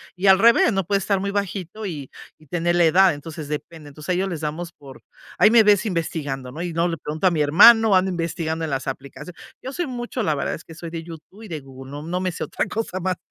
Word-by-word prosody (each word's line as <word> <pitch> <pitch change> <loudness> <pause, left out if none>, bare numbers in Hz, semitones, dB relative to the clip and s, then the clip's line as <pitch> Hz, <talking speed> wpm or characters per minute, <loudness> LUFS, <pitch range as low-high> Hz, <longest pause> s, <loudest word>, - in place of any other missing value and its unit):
y 185 +2 -4
al 190 -1 +7
revés, 235 +2 +5
no 195 -2 -1
puede 200 - +2
estar 200 0 0
muy 200 +1 -2
bajito 200 0 -4
y 150 -8 -6 0.3
y 155 - -21
tener 175 +3 0
la 175 -1 +4
edad. 180 +3 +5
Entonces, 155 +1 -8
depende. 150 +1 -7
Entonces, 150 +3 -11
a - - +3
ellos 185 +2 0
les 165 -4 -5
damos 160 +3 -4
por 135 -2 -14 0.3
ahí 210 - +6
me 235 -1 +7
ves 205 0 +4
investigando, 150 -8 -3
¿no? 155 +6 -7
Y 175 - -3
si - - -7
no 170 +2 +1
le 165 - -3
pregunto 155 +5 -1
a - - +3
mi 160 -3 0
hermano, 210 +8 +7
ando 185 +1 +3
investigando 165 -2 -3
en 155 - -5
las 135 0 -3
aplicacio 135 +6 -7 0.3
yo 260 - -6
soy 345 +1 -2
mucho 245 0 -4
la 155 - +1
verdad 140 - -2
es - - -12
que 165 - -12
soy 170 0 -8
de 165 0 -6
YouTube 170 +6 -12
y - - -9
de 160 - -4
Google. 135 0 -12
No 145 +1 -6
no 175 +3 -3
me 185 -1 -1
sé 170 - -5
otra - - -2
cosa 210 -4 -4
más 185 0 -2
170 Hz, 265 wpm, -22 LUFS, 155-195 Hz, 0.3 s, al